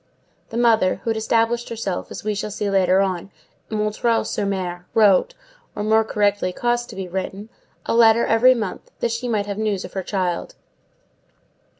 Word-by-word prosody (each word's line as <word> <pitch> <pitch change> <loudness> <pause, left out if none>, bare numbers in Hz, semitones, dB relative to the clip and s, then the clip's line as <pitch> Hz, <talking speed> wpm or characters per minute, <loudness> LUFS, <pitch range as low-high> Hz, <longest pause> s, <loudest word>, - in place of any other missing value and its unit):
The 230 - -5
mother, 225 -5 +3
who 230 - 0
had 225 - -2
established 230 +2 +1
herself, 210 -5 -4
as - - -8
we 215 0 -1
shall 205 +1 -3
see 205 0 -3
later 190 -1 +3
on, 190 -1 -2 0.4
at 215 - -3
M. 215 +2 +1
sur 200 -1 -2
M., 180 -2 -4
wrote, 215 - +4 0.4
or, 205 - -3
more 220 +1 +3
correctly, 205 -3 0
caused 240 +4 -1
to 220 - -9
be 190 -1 -5
written, 190 +3 -5 0.4
a - - -1
letter 230 0 +5
every 250 +3 +5
month, 215 -6 -5
that 235 - 0
she 235 +2 -3
might 215 -4 0
have 205 0 -5
news 210 -3 -1
of - - -11
her 190 - -2
child. 180 -2 -2
210 Hz, 185 wpm, -22 LUFS, 190-230 Hz, 0.4 s, letter